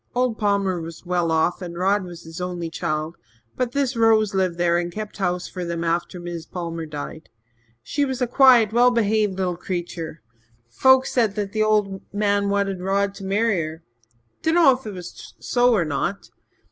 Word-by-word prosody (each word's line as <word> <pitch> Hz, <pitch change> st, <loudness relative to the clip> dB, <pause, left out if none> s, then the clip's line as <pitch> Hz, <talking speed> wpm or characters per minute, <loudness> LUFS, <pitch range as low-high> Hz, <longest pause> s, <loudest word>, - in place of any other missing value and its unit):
Old 250 Hz, -2 st, 0 dB
Palmer 200 Hz, -4 st, +1 dB
was 165 Hz, +2 st, -9 dB
well 175 Hz, -2 st, 0 dB
off 160 Hz, +4 st, +1 dB
and 170 Hz, -1 st, -6 dB
Rod 195 Hz, +2 st, +2 dB
was 175 Hz, -1 st, -10 dB
his 165 Hz, +2 st, -8 dB
only 175 Hz, -2 st, -4 dB
child, 160 Hz, -1 st, -3 dB, 0.4 s
but 250 Hz, -2 st, -1 dB
this 275 Hz, -2 st, 0 dB
Rose 220 Hz, -2 st, +3 dB
lived 185 Hz, -3 st, 0 dB
there 175 Hz, 0 st, +2 dB
and 175 Hz, 0 st, -3 dB
kept 215 Hz, +3 st, -6 dB
house 180 Hz, -2 st, -1 dB
for 180 Hz, -, -6 dB
them 170 Hz, -1 st, -3 dB
after 170 Hz, +2 st, -1 dB
Mis' 175 Hz, -2 st, -6 dB
Palmer 165 Hz, -2 st, -5 dB
died. 150 Hz, +1 st, -7 dB, 0.5 s
She 285 Hz, -, -1 dB
was 265 Hz, -3 st, -2 dB
a 250 Hz, -, +2 dB
quiet, 245 Hz, -3 st, +5 dB
well 245 Hz, +1 st, +6 dB
behaved 215 Hz, -4 st, +1 dB
little 180 Hz, -2 st, -1 dB
creetur. 170 Hz, -3 st, -5 dB, 0.4 s
Folks 260 Hz, -, +4 dB
said 225 Hz, -5 st, +2 dB
the 210 Hz, +1 st, -2 dB
old 210 Hz, -3 st, +1 dB
man 205 Hz, -1 st, +1 dB
wanted 200 Hz, -2 st, 0 dB
Rod 195 Hz, +1 st, 0 dB
to 200 Hz, 0 st, -10 dB
marry 200 Hz, 0 st, +1 dB
her 160 Hz, +1 st, -6 dB, 0.6 s
dunno 320 Hz, -3 st, +5 dB
if 260 Hz, 0 st, -1 dB
'twas 185 Hz, -7 st, -9 dB
so 245 Hz, 0 st, +2 dB
or 175 Hz, -5 st, +1 dB
not. 155 Hz, +6 st, -3 dB
195 Hz, 175 wpm, -23 LUFS, 170-215 Hz, 0.6 s, well